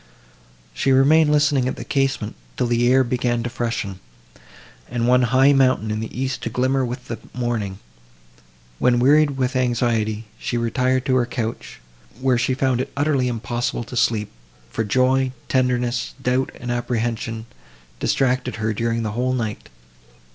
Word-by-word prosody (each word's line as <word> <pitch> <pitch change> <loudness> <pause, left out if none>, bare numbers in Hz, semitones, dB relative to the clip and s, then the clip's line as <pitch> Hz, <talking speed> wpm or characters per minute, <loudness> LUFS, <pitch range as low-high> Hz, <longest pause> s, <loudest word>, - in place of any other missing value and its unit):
She 135 - +1
remained 150 +4 +5
listening 145 -3 +3
at - - -2
the - - -7
casement, 135 -6 -1 0.2
till - - +1
the 120 +1 +2
air 130 0 +5
began 120 -1 -1
to 120 - -4
freshen, 115 -6 -3 0.9
and 120 -1 -1
one 125 +1 +5
high 130 +3 +4
mountain 130 -5 +2
in 110 - -2
the 110 - -4
east 130 0 -2
to - - -3
glimmer 130 +3 +1
with 125 0 -5
the 115 -2 -5 0.2
morning; 115 -6 -2 1.0
when, 125 -1 +3
wearied 140 +3 +4
with 130 0 -1
anxiety, 115 -3 0
she 120 - -2
retired 125 +2 0
to 130 -2 +2
her 120 -1 +1
couch, 115 -2 -5 0.4
where 130 -2 +2
she 130 +2 +1
found 130 -2 +1
it 135 - -5
utterly 140 -3 +1
impossible 120 0 -2
to 120 - -9
sleep, 110 -3 +1 0.4
for 115 - -1
joy, 130 +4 +2
tenderness, 125 -1 0
doubt 130 0 0
and 120 0 -4
apprehension, 115 -2 -2 0.5
distracted 130 -1 0
her 110 0 -1
during 115 +1 -1
the 110 - -2
whole 125 +3 0
night. 110 -4 -3
125 Hz, 155 wpm, -22 LUFS, 115-130 Hz, 1.0 s, remained